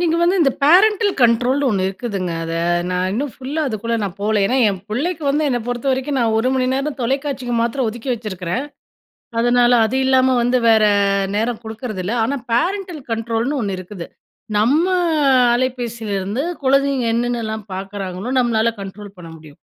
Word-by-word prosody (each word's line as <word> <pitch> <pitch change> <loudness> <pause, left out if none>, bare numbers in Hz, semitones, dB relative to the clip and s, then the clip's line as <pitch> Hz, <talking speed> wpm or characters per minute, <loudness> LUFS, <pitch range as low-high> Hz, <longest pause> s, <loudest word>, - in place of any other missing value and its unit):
நீங்க 335 -1 +1
வந்து, 355 +3 +3
இந்த 275 - +4
பேரன்டல் 405 +5 +5
கண்ட்ரோல்னு 250 +4 +3
ஒன்னு 190 -2 0
இருக்குதுங்க. 195 -3 -4
அத 165 0 -4 0.4
நான் 180 +1 0
இன்னும் 265 +4 -2
ஃபுல்லா 280 +4 -3
அதுக்குள்ள 230 +1 -3
நான்போல. 200 +3 -2
ஏன்னா? 255 - 0
என் 190 -3 -3
புள்ளைக்கு 310 +9 -2
வந்து, 295 +2 +1
என்ன 245 - +1
பொறுத்தவரைக்கும் 265 +3 -1
நான் 225 -2 +1
1 250 +3 +1
மணி 255 -1 +1
நேரம் 275 +1 -3
தொலைக்காட்சிக்கு 265 -1 -2
மாத்திரம் 235 +1 -1
ஒதுக்கி 235 +4 -5
வச்சிருக்கிறேன். 210 +2 -4 0.8
அதனால, 245 0 +3
அது 260 +4 -1
இல்லாம 260 0 +4
வந்து 245 +1 +2
வேற 220 -1 +5 0.5
நேரம் 230 +1 -1
குடுக்குறதில்ல. 220 -2 -4
ஆனா, 275 +4 -1
பேரன்டல் 355 +3 -1
கண்ட்ரோல்னு 230 +5 -1
ஒன்னு 195 -2 -2
இருக்குது. 185 -1 -8 0.5
நம்ம 285 - +3 0.7
அலைபேசிலருந்து 235 -3 -2 0.2
கொழந்தைங்க! 275 -1 +2
என்னென்னலாம் 230 -3 -2
பாக்குறாங்களோ 195 +2 -5
நம்மளால 230 -2 +2
கண்ட்ரோல் 195 0 -10
பண்ண 165 -2 -10
முடியும். 155 -2 -16
240 Hz, 145 wpm, -19 LUFS, 210-270 Hz, 0.8 s, பேரன்டல்